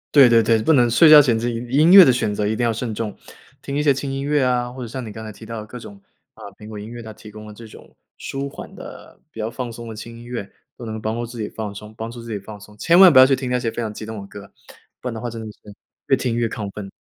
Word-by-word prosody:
对 135 -4 +8
对 115 -1 +5
对， 110 0 +2
不 160 - +3
能 125 -5 +4
睡 155 +7 +6
觉 150 -1 +10
前 120 -5 +1
自 120 +2 -2
己 120 - -4
音 150 +7 +4
乐 190 -1 +11
的 130 - +4
选 110 -4 -1
择 105 0 -1
一 110 - -1
定 120 - -2
要 115 - +2
慎 115 0 -4
重。 105 -2 -5 0.4
听 140 - -6
一 150 - 0
些 145 - +4
轻 135 +1 -5
音 135 0 -3
乐 145 0 +1
啊， 125 -1 0
或 130 - -9
者 120 - -5
像 125 +2 -6
你 110 - -8
刚 110 +1 -9
才 - - -7
提 110 - -13
到 115 0 -6
的 105 - -9
各 125 - -9
种 100 -4 -12 0.4
啊， - - -21 0.2
苹 105 - -12
果 105 -1 -8
音 105 - -8
乐 120 0 -9
它 110 - -9
提 105 0 -13
供 105 0 -11
了 105 - -11
这 115 +2 -12
种， - - -16 0.2
舒 140 +1 -5
缓 - - -11
的 - - -12
比 110 - -8
较 110 +1 -3
放 125 0 -5
松 115 0 -9
的 110 - -8
轻 115 +2 -10
音 120 - -12
乐， 120 -4 -6 0.3
都 120 - -9
能 110 0 -6
帮 110 0 -2
助 120 0 -3
自 120 +1 -10
己 105 - -4
放 105 -2 -6
松 105 +2 -10
帮 115 +1 -5
助 120 0 -9
自 115 - -9
己 105 - -3
放 105 +2 -11
松。 105 0 -15
千 170 +10 +3
万 185 -2 +9
不 130 - +7
要 130 - +10
去 135 0 +3
听 130 -1 -5
那 125 - +1
些 120 - -2
非 120 - -5
常 110 -2 -4
激 110 - -8
动 110 -2 -7
的 100 - -11
歌， 100 0 -12 0.5
不 125 - -4
然 - - -5
的 110 - -6
话 120 - -4
真 115 -1 -7
的 110 - -8
是 - - -24 0.5
越 135 - +4
听 125 -3 -2
越 115 -1 0
亢 105 -3 -6
奋。 100 -1 -8
115 Hz, 350 characters per minute, -21 LUFS, 110-125 Hz, 0.5 s, 乐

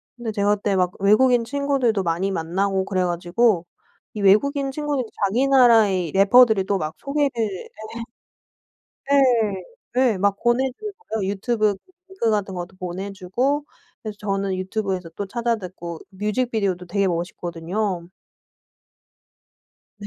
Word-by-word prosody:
근데 240 -2 -4
제가 205 0 +2
그때 205 -1 -1
막 180 -1 +2
외국인 235 +4 +4
친구들도 270 -5 0
많이 175 +4 -1
만나고 190 +3 -1
그래 185 -2 0
가지고 175 +2 +1 0.5
이 210 - -5
외국인 275 +8 +3
친구들이 290 -3 -2 0.2
자기 235 +8 +1
나라의 220 - +5
래퍼들이 215 +1 +6
또 195 +1 0
막 155 -2 -3
소개를 285 0 0 0.2
네. 195 -3 -6 1.4
네. 235 -9 +3 0.5
네 195 - -4
막 200 +1 +2
보내 250 +3 +2
주는 425 -1 -6
거예요. 220 - -3
유튜브 215 +1 0
그 195 - -21 0.2
링크 380 -12 -1
같은 205 -3 -1
것도 180 +1 -7
보내 185 +2 -5
주고 245 +10 -1 0.4
그래서 215 -2 -6
저는 195 -2 -1
유튜브에서 185 -2 -3
또 200 - -3
찾아 235 +3 -1
듣고 175 -4 -8
뮤직비디오도 205 -2 -1
되게 200 +3 0
멋있거든요. 175 +2 -3 1.9
네. 205 - -8
200 Hz, 300 characters per minute, -22 LUFS, 185-240 Hz, 1.9 s, 래퍼들이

